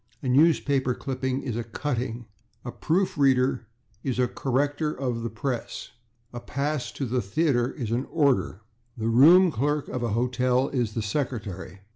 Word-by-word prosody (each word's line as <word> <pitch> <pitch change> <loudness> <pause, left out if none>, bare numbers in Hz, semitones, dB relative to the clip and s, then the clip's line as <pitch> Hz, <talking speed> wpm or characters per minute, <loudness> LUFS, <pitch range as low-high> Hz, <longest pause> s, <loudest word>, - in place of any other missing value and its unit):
A - - -3
newspaper 135 -2 +3
clipping 130 0 -3
is 125 -5 -3
a 120 - -2
/cutting/. 120 -1 -3 0.4
A 120 - -4
proof 175 +3 0
reader 130 -3 +2 0.4
is 130 -3 -2
a 125 -1 +2
/corrector 145 +5 -1
of 125 -3 -2
the 115 - -3
press/. 120 +2 -4 0.4
A 120 - -5
pass 140 -1 -3
to 135 - -3
the 125 +1 0
theatre 120 +4 +1
is 120 -7 -5
an 125 +3 -1
/order/. 140 - +1 0.4
The 110 0 -1
room 165 +10 +7
clerk 145 +3 -1
of 125 - -3
a 115 -3 -1
hotel 125 +2 +1
is 120 -5 -2
the 115 - -1
/secretary 105 - -4
125 Hz, 160 wpm, -26 LUFS, 120-140 Hz, 0.4 s, room